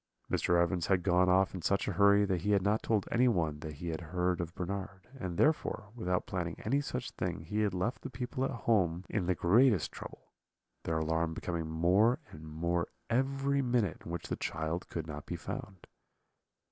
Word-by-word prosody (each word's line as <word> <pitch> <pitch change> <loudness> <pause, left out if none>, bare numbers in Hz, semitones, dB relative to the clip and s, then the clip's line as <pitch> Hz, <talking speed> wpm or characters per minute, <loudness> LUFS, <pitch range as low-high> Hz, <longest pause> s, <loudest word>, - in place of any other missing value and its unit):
"Mr. 85 0 +2
Evans 85 0 +1
had 95 -3 +2
gone 90 0 +4
off 95 +1 +3
in 95 - -5
such 100 +5 +1
a - - +1
hurry 100 +2 +5
that 95 -4 0
he 105 +3 +1
had 100 -2 +3
not 105 +2 +2
told 105 -4 0
anyone 90 -12 +2
that 75 0 -6
he 85 +4 -5
had 80 +1 -3
heard 90 +2 -1
of 85 0 -6
Bernard; 95 +1 -5
and 90 -6 -4
therefore, 130 -8 +1
without 90 -6 -1
planning 85 -3 -3
any 135 +6 +2
such 125 -3 -4
thing, 90 -3 -3
he 95 +7 -3
had 105 -3 +1
left 100 +8 -1
the - - -6
people 125 +1 -3
at 135 - +1
home 95 -8 +1
in 100 -5 0
the 90 - +2
greatest 105 +1 +4
trouble, - - -11 0.5
their 80 -1 0
alarm 80 +1 0
becoming 85 -3 -3
more 95 +10 +3
and 80 0 -10
more 85 +2 -1 0.2
every 135 +3 +1
minute 120 - 0
in - - -9
which 85 0 -4
the - - -2
child 80 +2 -3
could 80 -2 -4
not 75 -2 -7
be - - -3
found. 95 -2 -7
90 Hz, 195 wpm, -32 LUFS, 85-110 Hz, 0.5 s, hurry